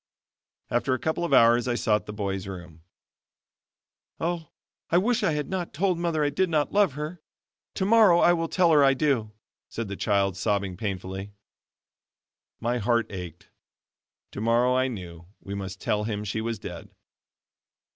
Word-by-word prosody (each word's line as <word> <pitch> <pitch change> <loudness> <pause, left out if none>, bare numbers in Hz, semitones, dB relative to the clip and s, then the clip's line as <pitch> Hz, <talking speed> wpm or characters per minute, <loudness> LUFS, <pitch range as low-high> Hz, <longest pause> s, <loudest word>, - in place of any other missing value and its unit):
After 130 +2 +1
a - - -5
couple 160 +5 -1
of 170 - -2
hours 120 +1 +5
I 120 - 0
sought 105 -3 0
the - - -5
boy's 100 -2 -3
room. 85 -4 -9 1.4
"Oh, 165 -2 -2 0.4
I 170 - +3
wish 240 +6 +2
I 180 -7 +1
had 150 -1 -2
not 180 -5 -4
told 180 +1 +1
mother 165 -3 0
I 145 - +1
did 190 +5 +1
not 150 -3 0
love 200 -7 +3
her. 155 +4 -6 0.5
Tomorrow 200 -2 +5
I 175 0 +5
will 165 -1 -1
tell 175 0 +3
her 150 -2 +6
I 135 -1 +5
do," 130 -7 0 0.4
said 115 -3 -5
the 100 - -4
child 100 -2 +1
sobbing 100 -1 -1
painfully. 95 0 -5 1.3
My 120 +2 -1
heart 115 +1 +1
ached; 90 -4 -8 0.8
tomorrow 115 +4 +2
I 130 +1 +2
knew 85 -8 -8
we 100 - -8
must 95 -1 -6
tell 105 0 -1
him 105 -2 -3
she 105 +2 -3
was 115 0 -3
dead. - - -8
120 Hz, 160 wpm, -26 LUFS, 100-160 Hz, 1.4 s, her